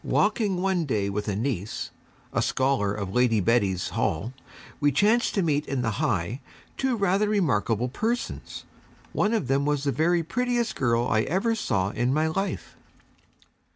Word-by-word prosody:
Walking 205 Hz, -3 st, +1 dB
one 190 Hz, -4 st, +1 dB
day 100 Hz, -7 st, -1 dB
with 105 Hz, +2 st, -3 dB
a 100 Hz, -, -1 dB
niece, 110 Hz, -3 st, -3 dB, 0.4 s
a -, -, +1 dB
scholar 130 Hz, -6 st, +1 dB
of 100 Hz, -2 st, -4 dB
Lady 125 Hz, -3 st, +3 dB
Betty's 100 Hz, -4 st, +1 dB
Hall, 120 Hz, +5 st, -1 dB, 0.5 s
we 145 Hz, -1 st, +3 dB
chanced 210 Hz, -, +2 dB
to 195 Hz, -, +2 dB
meet 150 Hz, -3 st, +1 dB
in 135 Hz, -3 st, -1 dB
the 115 Hz, 0 st, -2 dB
High 115 Hz, -, -1 dB, 0.3 s
two 265 Hz, -2 st, 0 dB
rather 200 Hz, +1 st, +2 dB
remarkable 125 Hz, -, +1 dB
persons. 225 Hz, -, -3 dB, 0.5 s
One 210 Hz, -, +1 dB
of 220 Hz, -, 0 dB
them 135 Hz, +2 st, +2 dB
was 145 Hz, -1 st, 0 dB
the 140 Hz, -, +1 dB
very 170 Hz, +3 st, +2 dB
prettiest 240 Hz, +6 st, -1 dB
girl 120 Hz, -2 st, +1 dB
I 110 Hz, -, +2 dB
ever 190 Hz, -, 0 dB
saw 100 Hz, -, 0 dB
in 120 Hz, +3 st, 0 dB
my 155 Hz, +3 st, +2 dB
life. 195 Hz, +5 st, -3 dB
140 Hz, 160 wpm, -26 LUFS, -, 0.5 s, Lady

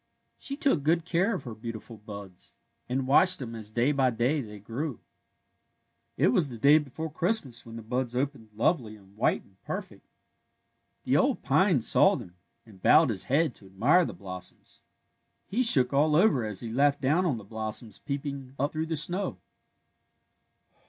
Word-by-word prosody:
She 275 Hz, -, -1 dB
took 275 Hz, -, +2 dB
good 165 Hz, +3 st, +1 dB
care 185 Hz, +5 st, +1 dB
of -, -, -6 dB
her 120 Hz, -, -7 dB
beautiful 115 Hz, +1 st, -8 dB
buds, 100 Hz, -3 st, -11 dB, 0.3 s
and 130 Hz, +1 st, -1 dB
watched 180 Hz, +7 st, +5 dB
them 120 Hz, -4 st, -7 dB
as 110 Hz, -2 st, -7 dB
day 120 Hz, +6 st, +1 dB
by 135 Hz, -3 st, +2 dB
day 125 Hz, +6 st, 0 dB
they 105 Hz, -4 st, -9 dB
grew. 120 Hz, +6 st, -5 dB, 1.2 s
It -, -, +3 dB
was 140 Hz, +3 st, +2 dB
the 120 Hz, -, -7 dB
day 145 Hz, +7 st, +6 dB
before 155 Hz, +2 st, -6 dB
Christmas 165 Hz, -, -1 dB
when 115 Hz, -, -9 dB
the 115 Hz, -, -8 dB
buds 125 Hz, +2 st, -2 dB
opened 135 Hz, -4 st, -3 dB
lovely 115 Hz, -2 st, 0 dB
and 100 Hz, -1 st, -20 dB
white 110 Hz, -, +1 dB
and 95 Hz, 0 st, -28 dB
perfect. -, -, -7 dB, 1.0 s
The -, -, +2 dB
old -, -, +1 dB
pine -, -, +3 dB
saw -, -, +4 dB
them, 90 Hz, -, -9 dB, 0.3 s
and 100 Hz, -5 st, -17 dB
bowed 155 Hz, -, +5 dB
his 95 Hz, -4 st, 0 dB
head 150 Hz, 0 st, +1 dB
to 100 Hz, -, -14 dB
admire 125 Hz, -, +3 dB
the -, -, -4 dB
blossoms. 90 Hz, -2 st, -9 dB, 0.6 s
He 230 Hz, +6 st, -1 dB
shook 140 Hz, -, +5 dB
aU 150 Hz, +2 st, +3 dB
over 150 Hz, -, +3 dB
as 105 Hz, -3 st, -3 dB
he 115 Hz, -2 st, -6 dB
laughed 140 Hz, +2 st, +2 dB
down 150 Hz, +7 st, +2 dB
on 135 Hz, -8 st, 0 dB
the 110 Hz, -, -9 dB
blossoms 110 Hz, 0 st, -6 dB
peeping 140 Hz, -2 st, -5 dB
up 140 Hz, +2 st, -1 dB
through 160 Hz, +1 st, -2 dB
the 160 Hz, -1 st, -2 dB
snow. 175 Hz, +6 st, 0 dB
130 Hz, 175 wpm, -28 LUFS, 110-155 Hz, 1.2 s, day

